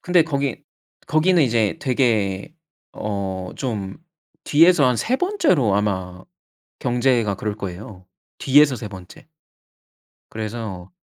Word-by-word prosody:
근데 180 -2 +4
거기 140 -5 -3 0.4
거기는 165 +2 +3
이제 115 -5 +1
되게 115 -4 0 0.4
어 95 -3 -4
좀 105 -7 -4 0.5
뒤에서 165 -1 +5
한 125 -2 +2
3 240 - 0
번째로 275 - +1
아마 95 -3 -2 0.6
경제가 120 -4 +1
그럴 105 0 -4
거예요. 95 -1 -8 0.3
뒤에서 140 0 +4
3 105 -2 -7
번째. 95 +4 -13 1.0
그래서 110 -4 -6
115 Hz, 205 characters per minute, -21 LUFS, 100-140 Hz, 1.0 s, 뒤에서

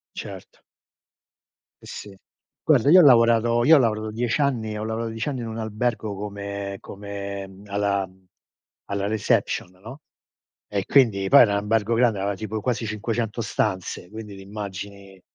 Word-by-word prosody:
Certo. - - -9 1.2
Eh, - - -14
sì. 100 -1 -9 0.5
Guarda, 140 - +4
io 185 +3 +9
ho - - +7
lavorato 115 -2 +5
io 160 +5 +8
ho - - +6
lavorato 110 -3 0
10 115 +3 -1
anni 115 -7 0
ho 105 - -4
lavorato 110 +1 -3
10 115 +3 -4
anni 135 -3 -3
in 115 - -5
un 110 - -6
albergo 110 -1 -2
come 100 0 -5
come 100 0 -7
uhm, 95 0 -14
alla 100 -1 0
uhm, 95 0 -24 0.6
alla 100 0 -1
reception, 105 -3 0
no, 120 +8 -10 0.7
e 100 -2 -2
quindi 110 -7 +3
poi 140 - +8
era 105 -4 +4
n - - +2
albergo 105 +2 0
grande, 115 -4 +2
aveva 100 +1 -1
tipo 110 +2 -5
quasi 120 -1 -1
500 110 +2 -3
stanze, 95 -4 -2
quindi 105 -1 -9
ti - - -11
immagini, 100 -1 -8
105 Hz, 165 wpm, -24 LUFS, 100-115 Hz, 1.2 s, io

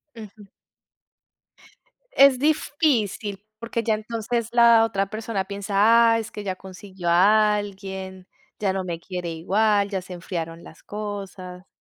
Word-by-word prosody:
Ujú. 210 -2 -12 1.6
Es 275 - +5
difícil, 250 - 0 0.2
porque 230 0 -3
ya 220 - +1
entonces 225 +1 -3
la 235 -1 +6
otra 195 -2 -2
persona 215 -2 -3
piensa: 200 0 -5 0.4
"Ah, 225 - +2
es 225 - -7
que 210 - -7
ya 190 -2 -3
consiguió 190 -1 -7
a 210 +5 +5
alguien, 190 -2 -7 0.3
ya 195 -2 0
no 190 -1 -2
me 170 -2 -5
quiere 180 0 -5
igual, 200 +4 +1
ya 195 -2 -3
se 180 0 -10
enfriaron 170 -2 -6
las - - -15
cosas". 195 -3 -7
200 Hz, 135 wpm, -23 LUFS, 190-220 Hz, 1.6 s, la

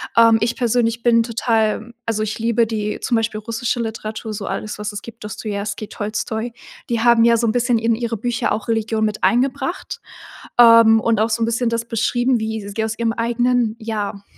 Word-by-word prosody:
Ähm, 230 -1 +6
ich 230 +1 0
persönlich 235 -1 +1
bin 230 -1 +4
total 225 -1 0
also 225 -2 -1
ich 215 0 -2
liebe 230 0 +1
die 210 -2 -3
zum 240 - 0
Beispiel 220 -1 -1
russische 230 +2 -2
Literatur, 220 -1 -5
so 205 -1 -5
alles 215 - -4
was 210 0 -4
es 205 - -6
gibt, 230 -2 -12
„Dostojewski“, 205 0 -5
„Tolstoj“, 215 +2 -4 0.4
die 235 -2 0
haben 235 -1 +5
ja 235 0 +5
so 235 - +1
'n - - +2
bisschen 240 -1 +1
in 230 0 +1
ihre 235 0 -3
Bücher 235 +1 -1
auch 215 - -2
Religion 225 -1 0
mit 215 0 -3
eingebracht, 270 +6 0 0.6
ähm, 230 -1 +8
und 225 -1 +1
auch 225 - +2
so 230 +1 0
'n - - +3
bisschen 230 +1 0
das 230 0 -2
beschrieben, 240 +2 +1
wie 220 -2 -4
sie 210 +2 -3
aus 220 0 -3
ihrem 230 -1 0
eigenen, 235 0 +1
ja, 210 -3 -4
225 Hz, 195 wpm, -20 LUFS, 215-235 Hz, 0.6 s, ähm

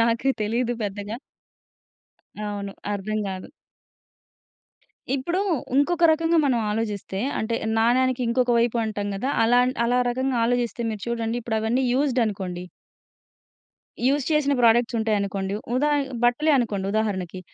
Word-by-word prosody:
నాకు 235 +3 +2
తెలియదు 235 +3 0
పెద్దగా. 205 +2 -4 1.2
అవును. 205 -1 -4 0.2
అర్థం 210 +2 -2
గాదు. 190 -1 -6 1.6
ఇప్పుడు 310 +7 -1 0.3
వుంకొక 335 +6 +2
రకంగా 325 +1 +2
మనం 260 -4 +2
ఆలోచిస్తే, 210 -3 -3 0.2
అంటే 230 +1 -1 0.2
నాణేనికి 255 +2 +2
ఇంకొక 245 +1 +1
వైపు 235 0 +1
అంటాం 205 -2 -3
కదా! 255 +8 -2
అలా, 245 +2 +5 0.3
అలా 245 +1 +2
రకంగా 260 +1 -1
ఆలోచిస్తే 240 -1 0
మీరు 215 -2 -6
చూడండి 235 0 -2
ఇప్పుడవన్నీ 225 +3 0
యూజ్‌డ్ 265 -2 +2
అనుకోండి... 185 -3 -4 1.4
యూజ్ 280 +1 +2
చేసిన 300 -2 +2
ప్రొడక్ట్స్ 235 +1 +4
ఉంటాయనుకోండి, 200 -3 -1 0.2
ఉదా 290 +4 +2 0.3
బట్టలే 245 +6 +3
అనుకోండి 210 -6 -1
ఉదాహరణకి, 190 -5 -2
230 Hz, 115 wpm, -24 LUFS, 210-255 Hz, 1.6 s, అలా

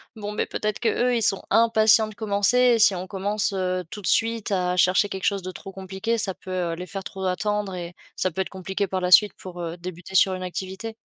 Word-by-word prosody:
Bon, 210 -1 -6
mais 210 - -1
peut-être 215 -1 -3
qu'eux, 245 +1 +1
ils 230 - +1
sont 195 - +4
impatients 220 0 +4
de 215 - -10
commencer. 205 +2 +1 0.2
Et - - -1
si 210 - +6
on 185 0 -5
commence, 205 +2 -1
heu, 185 -1 -2
tout 205 - -6
de - - -3
suite 225 -2 +2
à 180 -1 0
chercher 185 +3 +3
quelque 190 -1 -6
chose 200 -1 +1
de 185 - -6
trop 195 +2 -10
compliqué, 190 +4 -3
ça 195 -4 -1
peut, 185 - -10
heu, 175 -2 -2
les 180 +2 -7
faire 195 +1 -7
trop 190 0 -6
attendre. 205 +1 -1
Et 175 -1 -7 0.2
ça 185 - 0
peut 185 +2 -3
être - - -4
compliqué 190 +1 -3
par 190 -1 -3
la 180 - 0
suite 205 +3 +6
pour, 180 -1 -10
heu, 170 -1 -4
débuter 180 +1 -9
sur 190 0 +4
une 185 - -6
activité? 190 +4 -6
190 Hz, 245 wpm, -24 LUFS, 185-210 Hz, 0.2 s, si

